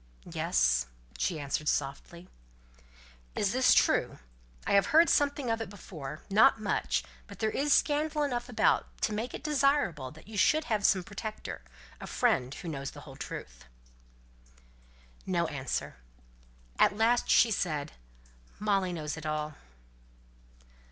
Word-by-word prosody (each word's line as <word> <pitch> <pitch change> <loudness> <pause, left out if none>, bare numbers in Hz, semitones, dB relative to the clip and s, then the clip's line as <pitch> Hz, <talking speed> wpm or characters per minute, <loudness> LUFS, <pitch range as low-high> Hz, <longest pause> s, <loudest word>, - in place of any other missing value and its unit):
"Yes!" - - +2 0.3
she 150 - 0
answered, 145 +1 -1
softly. 145 +5 -3 1.1
"Is - - +1
this - - +4
true? - - +2 0.5
I - - -1
had 200 0 +5
heard 325 +3 +5
something 285 -4 +1
of 225 0 -1
it 225 - -5
before 155 -7 -9
not 220 +5 +5
much; 65 - 0 0.2
but - - -11
there 220 0 0
is 290 +2 0
scandal 300 +1 +2
enough 245 -3 -2
about 245 - +2 0.2
to 215 - +1
make 225 +4 -3
it - - -8
desirable 275 - +1
that 155 +8 -15
you 215 -2 -4
should 310 +11 +4
have 215 -8 +1
some 185 -2 +2
protector 200 - -6 0.4
some - - -8
friend 125 +1 +1
who 170 - -8
knows 140 -4 -4
the - - -11
whole - - -12
truth." - - -8 1.6
No 175 -2 +1
answer. 135 - -4 0.8
At 205 - +4
last 235 +2 +2
she 235 - +5
said, 155 -7 -1 0.7
"Molly 200 -3 +1
knows 155 -2 -4
it 160 - -8
all." 155 0 -2
195 Hz, 140 wpm, -30 LUFS, 150-240 Hz, 1.6 s, had